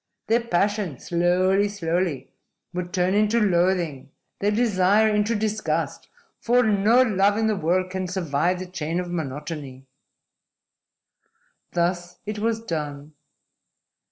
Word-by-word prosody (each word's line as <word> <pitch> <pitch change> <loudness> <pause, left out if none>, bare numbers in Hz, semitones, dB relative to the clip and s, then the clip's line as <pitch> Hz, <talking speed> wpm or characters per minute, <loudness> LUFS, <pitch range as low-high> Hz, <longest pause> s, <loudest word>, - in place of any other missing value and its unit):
Their 230 +2 +2
passion 200 - 0
slowly, 185 +4 +2
slowly 175 -5 -2 0.4
will 180 0 -3
turn 180 0 0
into 215 +3 +3
loathing; 175 - +1 0.3
their 205 - +1
desire 210 -1 +3
into 210 +2 +1
disgust. 205 -7 -2 0.3
For 245 +1 +3
no 220 +3 +4
love 205 -3 +2
in 225 - +1
the 220 -1 +2
world 185 +1 0
can 190 0 -3
survive 175 -1 0
the 185 - -5
chain 170 -2 -3
of 180 -1 -4
monotony!" 145 -3 -5 1.9
Thus 175 0 -1
it 210 0 -4
was 225 +1 0
done. 150 -6 -5
185 Hz, 120 wpm, -24 LUFS, 170-210 Hz, 1.9 s, no